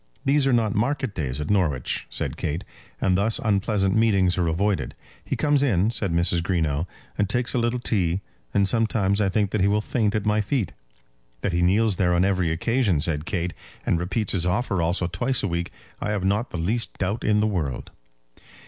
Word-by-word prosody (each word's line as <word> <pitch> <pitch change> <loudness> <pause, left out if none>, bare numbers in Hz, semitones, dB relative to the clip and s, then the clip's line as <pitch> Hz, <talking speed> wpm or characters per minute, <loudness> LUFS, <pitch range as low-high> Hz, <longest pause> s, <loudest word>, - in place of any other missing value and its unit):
"These 140 0 +3
are - - +3
not 115 -4 +2
market 130 +1 0
days 70 -6 -3
at 75 +6 -2
Norwich," 75 -11 0
said - - -3
Kate; 80 +6 -3 0.4
"and 90 - +2
thus 105 +4 +2
unpleasant 100 -5 +1
meetings 100 -5 +3
are 90 -2 0
avoided." 95 +5 0 0.3
"He - - -2
comes 145 -2 +2
in," 110 -6 +2
said 100 -6 -1
Mrs. 85 +1 +1
Greenow, 80 -3 0 0.3
"and 100 -1 +1
takes 120 +2 0
a 125 - +1
little 120 +1 0
tea; 95 -6 0 0.3
and 100 -1 +2
sometimes 105 -3 +1
I 100 - +2
think 100 0 0
that 105 - 0
he 95 - +4
will 105 +1 +2
faint 105 0 0
at 105 -1 -1
my 105 0 +2
feet." 105 - -1 0.7
"That 100 - -1
he 85 - +1
kneels 100 +3 +3
there 90 -2 +2
on 90 +2 +3
every 95 -4 +1
occasion," 100 - +1
said 75 0 -2
Kate, 90 -2 -2 0.3
"and 85 - +1
repeats 95 +5 -1
his 90 -2 +1
offer 95 0 0
also 85 +2 0
twice 120 +9 0
a - - +1
week, 85 -1 -2 0.3
I - - -3
have 105 -3 -1
not 100 +5 +1
the - - -5
least 110 +8 -2
doubt 100 +4 -2
in 105 -1 +3
the 105 - +2
world." 85 - -2
100 Hz, 200 wpm, -24 LUFS, 90-110 Hz, 0.7 s, he